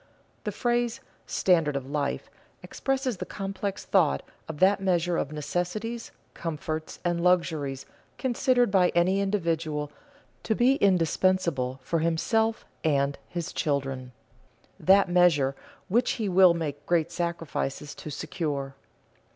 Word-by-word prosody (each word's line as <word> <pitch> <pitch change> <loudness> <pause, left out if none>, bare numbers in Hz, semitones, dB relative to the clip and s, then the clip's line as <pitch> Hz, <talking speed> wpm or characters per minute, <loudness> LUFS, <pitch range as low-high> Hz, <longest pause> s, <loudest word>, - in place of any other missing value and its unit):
_ - - -39
The - - -1
phrase 240 -1 0 0.3
"standard 165 -6 +2
of 135 -1 -3
life" 145 0 -2 0.4
expresses 265 -4 -2
the - - -5
complex 195 0 -4
thought 70 - +2 0.3
of 160 - -5
that 195 +4 +4
measure 175 -2 +1
of 145 - -1
necessities, 180 +10 -3 0.2
comforts, 155 -1 -4
and 170 -1 0
luxuries 160 -7 +1 0.3
considered 250 -2 +2
by 185 -2 +4
any 185 +3 +3
individual 165 -7 -1 0.5
to 220 - 0
be 255 +4 +4
indispensable 170 - +2
for 165 +5 0
himself 220 +8 +1 0.2
and 140 -2 +2
his 170 -2 -4
children; 135 -3 -2 0.7
that 195 +1 +5
measure 170 -7 +3 0.3
which 235 +6 +2
he 220 -4 -2
will 185 -2 +6
make 145 -3 -4
great 170 -1 +2
sacrifices 165 -4 -3
to - - -8
secure. 140 -2 -3
170 Hz, 125 wpm, -27 LUFS, 150-195 Hz, 0.7 s, will